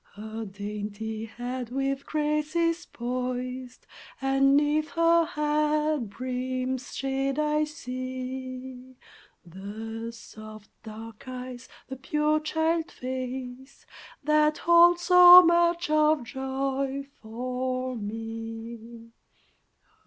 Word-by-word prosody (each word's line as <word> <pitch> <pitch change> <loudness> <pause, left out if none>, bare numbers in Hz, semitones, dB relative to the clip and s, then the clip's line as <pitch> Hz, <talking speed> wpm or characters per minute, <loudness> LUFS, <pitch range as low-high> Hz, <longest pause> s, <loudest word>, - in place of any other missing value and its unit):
Her 220 +2 -6
dainty 210 +2 -5
head 245 +1 -5
with 275 +1 -2
grace 300 0 -1
is 335 0 +1
poised, 250 +1 -4 0.3
And 270 0 +3
'neath 300 +1 +1
her 335 0 +4
hat 300 - 0
brim's 255 +2 -3
shade 270 0 -1
I 300 0 +1
see 255 -2 -7 0.5
The 220 +6 -7
soft, 215 -2 -12
dark 225 +3 -10
eyes, 255 -1 -7 0.2
the 265 - -7
pure 300 +3 +1
child 320 +1 0
face 255 +1 -6 0.4
That 305 +1 +3
hold 345 +1 +6
so 360 +1 +9
much 340 0 +3
of 305 -2 +3
joy 270 +2 -3 0.2
for 255 +3 -3
me! 225 +1 -7
260 Hz, 95 wpm, -27 LUFS, 235-300 Hz, 0.5 s, so